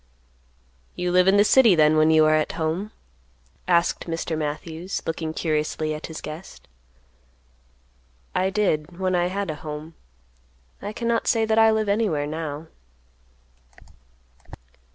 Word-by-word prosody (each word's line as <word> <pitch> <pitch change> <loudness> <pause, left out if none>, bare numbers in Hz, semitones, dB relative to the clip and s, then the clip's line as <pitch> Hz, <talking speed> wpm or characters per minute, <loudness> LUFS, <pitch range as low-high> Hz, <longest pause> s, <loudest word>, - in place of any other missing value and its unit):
"You 180 0 -2
live 180 +1 +4
in 195 +1 +5
the 205 - +6
city, 225 -3 +5
then, 155 -1 +4
when 155 0 +4
you 160 -1 +5
are 155 - +4
at 155 -1 +1
home?" 165 +6 -2 0.8
asked 170 -1 +1
Mr. 165 0 -3
Matthews, 160 +4 -4
looking 160 -1 -3
curiously 155 -1 -1
at 155 - -6
his 160 - -8
guest. 155 +5 -10 1.7
"I 190 - +1
did, 175 -5 -1
when 185 0 -1
I 175 0 +2
had 195 -1 -3
a - - -6
home; 155 +1 -7 0.9
I 205 - -5
cannot 235 +1 -1
say 225 -1 +2
that 220 0 +2
I 225 0 +6
live 220 -1 +1
anywhere 200 -8 0
now." 155 0 -5
165 Hz, 135 wpm, -24 LUFS, 155-200 Hz, 1.7 s, the